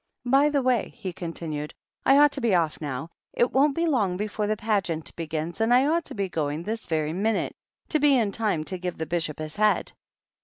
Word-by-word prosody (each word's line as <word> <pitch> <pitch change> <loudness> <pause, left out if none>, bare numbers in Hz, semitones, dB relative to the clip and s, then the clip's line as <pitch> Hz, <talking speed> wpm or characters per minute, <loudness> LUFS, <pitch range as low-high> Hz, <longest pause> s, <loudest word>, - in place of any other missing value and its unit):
" - - -50
By 295 +1 +4
the 285 -2 +1
way," 250 -4 +1
he 185 -2 -5
continued, 160 -3 -5 0.2
" - - -48
I 270 - +7
ought 295 0 +6
to - - -2
be 230 -5 +3
off 165 -3 0
now. 145 +2 -4 0.2
It 240 - +2
won't 275 +1 +3
be 335 - +1
long 210 - +1
before 210 +1 -2
the 215 0 0
Pageant 195 -8 -1
begins, 165 +3 -4
and 225 +1 +2
I 250 +2 +5
ought 330 +2 +1
to - - -8
be 200 -2 -1
going 155 -2 -2
this 220 +3 -4
very 155 -2 -1
minute, 210 +4 0 0.4
to 310 - +2
be 290 -2 +5
in 220 -4 +1
time 205 -7 0
to 185 +3 -4
give 180 0 -4
the 160 - -3
Bishop 160 -2 -2
his 155 +2 -6
head. 215 0 +2
200 Hz, 230 wpm, -26 LUFS, 160-240 Hz, 0.4 s, I